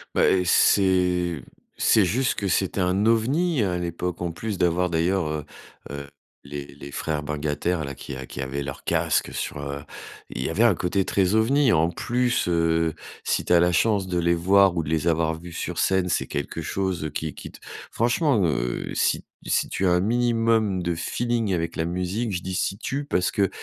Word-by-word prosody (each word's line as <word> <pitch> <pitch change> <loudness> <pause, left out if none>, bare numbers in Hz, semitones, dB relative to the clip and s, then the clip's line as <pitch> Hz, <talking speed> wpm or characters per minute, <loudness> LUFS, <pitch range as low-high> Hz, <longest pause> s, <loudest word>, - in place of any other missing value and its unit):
Bah - - +4
et 90 - +3
c'est 90 -3 +3 0.4
c'est 110 - +4
juste 120 +8 +1
que 100 - -2
c'était 95 +2 0
un 90 +3 +1
ovni 130 +6 +2
à 90 -3 0
l'époque, 90 0 -4
en 85 -1 -1
plus 105 +4 -4
d'avoir 90 +1 +1
d'ailleurs, 85 +2 +1
heu 75 -1 -3 0.4
heu, 70 0 -6 0.4
les 70 0 -6
les 70 0 -10
frères 75 +1 -2
bungataires 75 +3 -2
là 70 0 -6
qui 70 - -8
qui 65 - -6
avaient 70 +2 -3
leur 70 - -6
casque - - 0
sur, - - -4
heu, 70 0 -5 0.5
il - - -5
y - - -1
avait 95 +8 +2
un 115 -6 +5
côté 90 +3 0
très 95 -1 +1
ovni. 125 +4 +3
En 80 -2 +3
plus, 120 +2 0
heu, 80 -1 +2 0.3
si - - 0
tu - - +2
as 85 - +6
la 90 +1 +3
chance 100 +2 +2
de 90 -1 -1
les 85 0 +2
voir 95 +2 +4
ou 85 - 0
de 75 - -6
les 80 +1 0
avoir 80 -1 +1
vu 85 0 -10
sur - - -4
scène. 95 -1 +2
C'est - - 0
quelque - - -4
chose 95 -5 -2
qui 80 -2 -3
qui - - -9
t - - -15 0.3
franchement, 120 - +2
heu, 60 -6 -2
si - - +1
t - - -41 0.2
si - - +1
tu 95 - 0
as - - +3
un 90 0 +3
minimum 115 -3 +1
de 85 0 0
feeling 115 +4 -1
avec 85 -1 -2
la 80 - 0
musique, 90 +6 -2
je 90 - -2
dis: 95 - -4
«Si 95 +1 -1
tu», 140 +6 -3
parce 90 -10 0
que, 100 -2 +1
90 Hz, 205 wpm, -24 LUFS, 80-105 Hz, 0.5 s, as